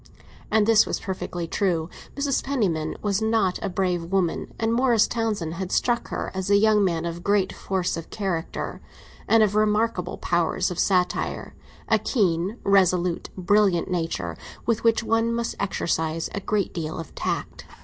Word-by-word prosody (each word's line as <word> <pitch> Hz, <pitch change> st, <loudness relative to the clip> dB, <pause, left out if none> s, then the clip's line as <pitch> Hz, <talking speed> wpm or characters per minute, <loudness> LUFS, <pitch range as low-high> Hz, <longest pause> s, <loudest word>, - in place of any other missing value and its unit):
And 220 Hz, -1 st, +3 dB
this 220 Hz, -1 st, +5 dB
was -, -, -2 dB
perfectly 175 Hz, -3 st, -4 dB
true. 170 Hz, -4 st, 0 dB, 0.3 s
Mrs. 280 Hz, -1 st, 0 dB
Penniman 185 Hz, -, -1 dB
was 205 Hz, 0 st, 0 dB
not 220 Hz, -4 st, +1 dB
a 200 Hz, -, -2 dB
brave 180 Hz, -2 st, -1 dB
woman, 180 Hz, -1 st, -1 dB
and 225 Hz, 0 st, +1 dB
Morris 235 Hz, -3 st, +4 dB
Townsend 215 Hz, -9 st, -2 dB
had 180 Hz, +1 st, -5 dB
struck 240 Hz, -1 st, +1 dB
her -, -, -4 dB
as 190 Hz, 0 st, -3 dB
a 200 Hz, -, +5 dB
young 210 Hz, 0 st, +4 dB
man 170 Hz, -3 st, 0 dB
of 170 Hz, +1 st, -5 dB
great 200 Hz, -1 st, +2 dB
force 190 Hz, -2 st, -2 dB
of 165 Hz, -1 st, -7 dB
character, 190 Hz, -6 st, -3 dB, 0.5 s
and 225 Hz, -1 st, +5 dB
of 205 Hz, -2 st, +1 dB
remarkable 215 Hz, -2 st, +1 dB
powers 175 Hz, +2 st, 0 dB
of 175 Hz, -, -4 dB
satire; 180 Hz, -2 st, 0 dB, 0.3 s
a -, -, +3 dB
keen, 190 Hz, -2 st, 0 dB
resolute, 180 Hz, -3 st, +2 dB
brilliant 190 Hz, -2 st, +2 dB
nature, 165 Hz, -2 st, -2 dB, 0.3 s
with 230 Hz, -1 st, 0 dB
which 230 Hz, -1 st, +3 dB
one 225 Hz, +1 st, +1 dB
must 235 Hz, -1 st, -2 dB
exercise 160 Hz, -4 st, -1 dB
a -, -, -2 dB
great 200 Hz, 0 st, -1 dB
deal 160 Hz, 0 st, -4 dB
of 165 Hz, -, -7 dB
tact. -, -, -4 dB
195 Hz, 160 wpm, -24 LUFS, 175-220 Hz, 0.5 s, this